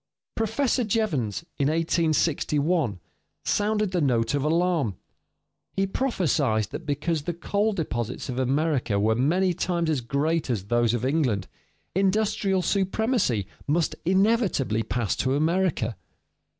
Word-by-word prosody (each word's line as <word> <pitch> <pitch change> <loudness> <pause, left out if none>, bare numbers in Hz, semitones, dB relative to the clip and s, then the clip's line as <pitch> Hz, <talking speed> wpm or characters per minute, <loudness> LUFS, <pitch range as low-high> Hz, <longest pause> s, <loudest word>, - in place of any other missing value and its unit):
Professor 230 +3 0
Jevons, 170 - -1
in 140 - +2
1861, 155 - +1 0.5
sounded 210 -1 +1
the 180 -2 0
note 120 -4 +1
of 140 -1 0
alarm; 160 - +1 0.8
he 195 - +1
prophesied 185 - +1
that - - -7
because 150 +2 -1
the 170 +3 -4
coal 205 +5 0
deposits 125 - -3
of 125 -1 -3
America 130 -5 +1
were 110 +2 +3
many 175 +10 +2
times 170 -2 0
as 145 -5 0
great 145 +6 0
as 110 -7 -1
those 120 +1 +2
of 120 - -2
England, 130 -9 +1 0.5
industrial 195 -1 +1
supremacy 195 - +1 0.2
must 160 +3 +1
inevitably 190 - +2
pass 115 -3 -1
to 130 +1 0
America. 160 - +1
160 Hz, 125 wpm, -25 LUFS, 125-190 Hz, 0.8 s, were